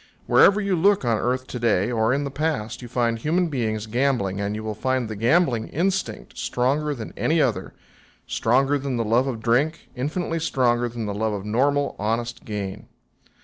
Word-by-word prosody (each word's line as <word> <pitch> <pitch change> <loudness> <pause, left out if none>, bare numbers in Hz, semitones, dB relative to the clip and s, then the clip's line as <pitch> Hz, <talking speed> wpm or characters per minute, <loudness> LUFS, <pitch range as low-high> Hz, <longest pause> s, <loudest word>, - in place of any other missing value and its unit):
Wherever 200 +1 +5
you 200 -2 0
look 195 -2 +3
on 115 -3 +2
earth 125 +1 -1
to 125 - -6
day 115 -2 +2
or 110 -1 +2
in 140 +2 +1
the 140 - -4
past 145 -7 -2
you 120 - -8
find 115 -1 0
human 170 +7 +1
beings 110 -6 -2
gambling, 115 -5 0
and 100 +1 -2
you 110 - -5
will 110 -1 -3
find 130 +2 -1
the 110 - -5
gambling 120 - +2
instinct 190 +5 -2
stronger 145 +4 0
than 110 -4 -7
any 160 +1 +1
other 115 -10 0 0.5
stronger 135 +5 +2
than 135 -2 -2
the 115 - 0
love 120 +5 +2
of 115 -4 -4
drink, 140 +8 +1
infinitely 165 +5 -2
stronger 120 -6 +1
than 115 -1 -5
the 105 - -3
love 110 +1 -1
of 100 -1 -5
normal, 140 +6 +1
honest 115 +3 -2
gain. 105 -1 -5
125 Hz, 190 wpm, -24 LUFS, 110-145 Hz, 0.5 s, Wherever